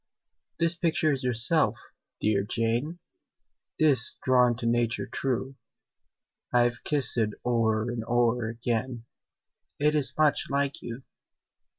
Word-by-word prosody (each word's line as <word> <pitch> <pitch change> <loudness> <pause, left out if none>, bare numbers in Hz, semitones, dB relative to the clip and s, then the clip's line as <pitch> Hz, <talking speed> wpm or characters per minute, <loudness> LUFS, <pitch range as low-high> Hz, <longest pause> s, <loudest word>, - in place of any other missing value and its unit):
"This 165 +1 +2
picture 165 -2 0
is 135 -2 -3
yourself, 125 0 +2 0.4
dear 105 -2 +1
Jane 115 - -2 0.8
'Tis 150 -4 +5
drawn 125 -2 +3
to 120 - -5
nature 120 0 0
true: 130 0 -3 0.9
I've 120 -1 +1
kissed 145 -4 0
it 110 -2 0
o'er 110 -3 +1
and 120 -2 -4
o'er 120 -1 +1
again, 115 +1 -3 0.7
It 150 +1 +2
is 140 -2 +1
much 155 -2 +2
like 140 0 -1
you." 120 +2 -8
125 Hz, 115 wpm, -27 LUFS, 115-140 Hz, 0.9 s, Tis